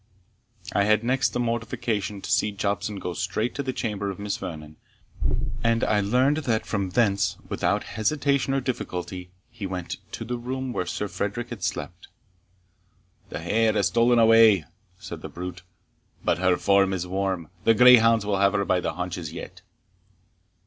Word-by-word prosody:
I 100 - +3
had 105 +1 +3
next 130 +3 +2
the - - -3
mortification 115 -4 -2
to - - -4
see 105 - +2
Jobson 100 +1 -2
go 90 -2 -4
straight 100 +7 -2
to 140 - -3
the 130 -1 -2
chamber 105 -5 -3
of 95 - -5
Miss 100 0 -3
Vernon, 80 -4 -8 0.9
and 115 0 +2
I 105 -1 +2
learned 125 +8 +2
that 120 -8 -1
from 100 -3 -2
thence, 100 -3 +1
without - - 0
hesitation 140 +4 0
or 135 - +1
difficulty, 90 -7 -4 0.2
he 110 -5 -5
went 90 -2 -5 0.2
to - - -5
the 120 0 -3
room 130 +1 -4
where 90 - -2
Sir 105 - -2
Frederick 105 +5 -3
had 115 -5 -6
slept. 90 -1 -4 1.2
"The - - -5
hare 110 0 +2
has 105 -2 +2
stolen 120 +1 +3
away," 115 -6 +6 0.3
said - - -8
the - - -7
brute, 90 +1 -7 0.6
"but - - +2
her 90 -1 +3
form 100 -1 +3
is 90 -2 -2
warm 95 -3 -2
the 115 - +5
greyhounds 115 -3 +7
will 100 -2 0
have 100 0 +4
her 100 -1 +1
by 90 - +2
the - - -2
haunches 90 -3 -4
yet." - - -9
105 Hz, 170 wpm, -25 LUFS, 95-120 Hz, 1.2 s, greyhounds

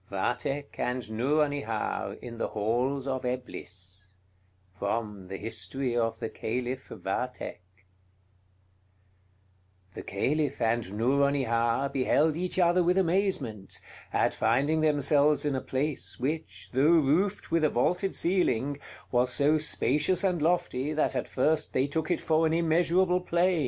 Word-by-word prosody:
VATHEK 125 +8 -2
AND 125 -2 -2
NOURONIHAR 140 -1 -1
IN 115 -1 -8
THE - - 0
HALLS 125 +6 -1
OF 130 -1 -2
EBLIS 95 -7 -6 0.6
From 100 -1 -3
'The 95 +1 -5
History 115 +4 -2
of 115 -1 0
the - - -3
Caliph 125 +4 -4
Vathek' 95 -3 -5 2.1
The - - -6
Caliph 140 +8 -1
and 115 -3 0
Nouronihar 130 -1 +2
beheld 150 +4 +2
each 180 +2 -2
other 175 0 +4
with 180 +2 +2
amazement, 170 - 0 0.3
at - - +2
finding 140 +8 +2
themselves 150 0 +3
in 145 - +1
a 130 - -1
place 140 +3 -3
which, 105 -9 -4
though 130 - +2
roofed 165 +5 +2
with 165 -1 +2
a 155 - +4
vaulted 180 +10 0
ceiling, 145 -7 +1 0.3
was 125 0 +2
so 150 +4 +3
spacious 150 - +1
and 180 -4 +1
lofty 155 -4 0
that 155 - 0
at - - -1
first 155 0 0
they 130 - +2
took 155 +3 -2
it 175 - +1
for 160 0 +2
an 160 - 0
immeasurable 175 +2 +2
plain. 175 0 +2
135 Hz, 130 wpm, -28 LUFS, 115-160 Hz, 2.1 s, other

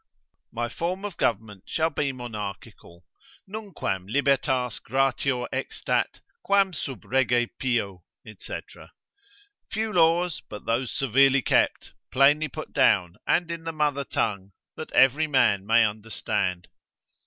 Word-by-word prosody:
My - - -2
form 180 +4 -3
of 200 -4 -5
government 105 -3 -2
shall 160 +1 0
be 140 -1 -1
monarchical. 105 -7 -8 0.4
nunquam 190 - -4
libertas 130 -1 +1
gratior 135 0 0
extat, 130 +1 -2 0.2
Quam 195 -2 +2
sub 135 -5 -6
Rege 125 -2 +2
pio, 105 -8 -1 0.3
&c. - - -6 1.1
few 220 +1 -2
laws, 170 0 +3
but 105 - -9
those 115 +2 0
severely 135 +1 +3
kept, - - +1 0.2
plainly 145 +4 +4
put 155 +2 -8
down, 100 -10 +3
and 170 -1 +1
in 165 -1 -5
the 165 - -3
mother 150 -3 0
tongue, 100 -5 -2 0.2
that 155 - -7
every 140 +4 +4
man 100 -9 +2
may 115 +1 +5
understand. 105 -4 -2
130 Hz, 120 wpm, -26 LUFS, 110-155 Hz, 1.1 s, may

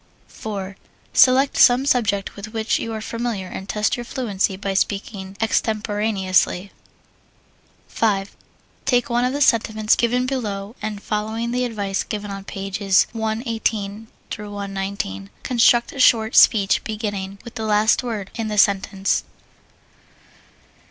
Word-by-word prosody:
4. 195 -3 -6 0.4
Select 265 +2 +5
some 250 +2 +6
subject 215 -8 +1
with 215 +2 -9
which 220 0 0
you 230 - -4
are 220 -1 -4
familiar 230 -4 -3
and 190 +1 -8
test 210 +1 +1
your 240 - -5
fluency 210 -7 -2
by 195 0 -3
speaking 195 0 -2
extemporaneously. 210 -4 0 1.2
5. 200 -3 -1 0.5
Take 245 -2 +1
one 240 +1 +2
of 250 - +1
the 285 +2 -3
sentiments 220 -4 +3
given 245 +1 +1
below 215 -5 -3
and, 210 -2 -5
following 220 +2 -2
the 250 +1 0
advice 205 -4 -2
given 205 -1 -5
on 195 0 -7
pages 195 0 +1
118 220 -2 -2 0.3
119, 195 - -5
construct 240 -1 +3
a 275 - -8
short 225 -3 +4
speech 200 -4 +5
beginning 205 -3 -4
with 235 -1 -10
the 225 - -5
last 215 +1 +3
word 220 -6 -5
in 225 -2 -3
the 210 -1 -3
sentence. 195 -1 +2
215 Hz, 130 wpm, -21 LUFS, 195-230 Hz, 1.2 s, some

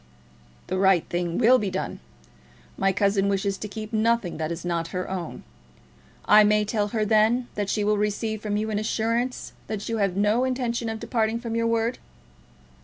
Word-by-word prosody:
"The 185 - -2
right 190 -3 +3
thing 175 -1 -2
will 250 +2 +5
be 205 - -1
done. 190 +1 -4 0.8
My 195 - +2
cousin 200 0 +1
wishes 195 0 0
to 210 - -4
keep 215 +2 -7
nothing 220 -5 +1
that 155 0 -3
is 170 +1 -5
not 170 -1 -1
her 185 - -3
own. 180 -4 -5 0.8
I 210 0 +7
may 210 0 +3
tell 210 -1 0
her, 215 0 -1
then, 220 +3 +3
that 205 -1 -2
she 210 - 0
will 210 0 +2
receive 210 +1 -1
from 210 -1 -1
you 215 +1 -2
an 205 - 0
assurance 230 +3 -1
that 210 -1 -4
you 225 - -1
have 200 -3 +1
had - - -7
no 210 +4 +2
intention 245 -3 -1
of 220 0 -4
departing 225 -1 -1
from 230 -1 -5
your 230 0 +1
word?" 230 +1 0
210 Hz, 190 wpm, -25 LUFS, 195-230 Hz, 0.8 s, I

